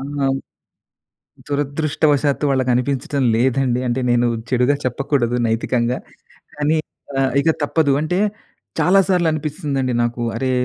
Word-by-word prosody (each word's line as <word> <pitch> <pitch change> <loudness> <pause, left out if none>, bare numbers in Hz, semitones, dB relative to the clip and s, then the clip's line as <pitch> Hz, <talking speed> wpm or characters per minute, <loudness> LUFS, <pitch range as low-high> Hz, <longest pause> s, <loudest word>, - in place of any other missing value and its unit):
ఆ! - - -6 1.5
దురదృష్టవశాత్తు 145 0 0
వాళ్ళకి 130 -2 +1
అనిపించటం 135 +2 -1
లేదండి. 125 0 +1
అంటే 120 +2 0
నేను 120 0 +3 0.2
చెడుగా 125 +2 +3
చెప్పకూడదు 125 -1 0
నైతికంగా. 120 +2 0 0.6
కానీ 150 +2 +1 0.4
ఆహ్, 135 -1 +2
ఇక 160 - +3
తప్పదు 145 -1 +2
అంటే 170 +4 -1 0.6
చాలా 195 +2 +5
సార్లు 180 -3 +2
అనిపిస్తుందండి 145 -4 -2
నాకు. 120 0 -2
అరే! 130 +2 -1
135 Hz, 115 wpm, -20 LUFS, 125-150 Hz, 1.5 s, చాలా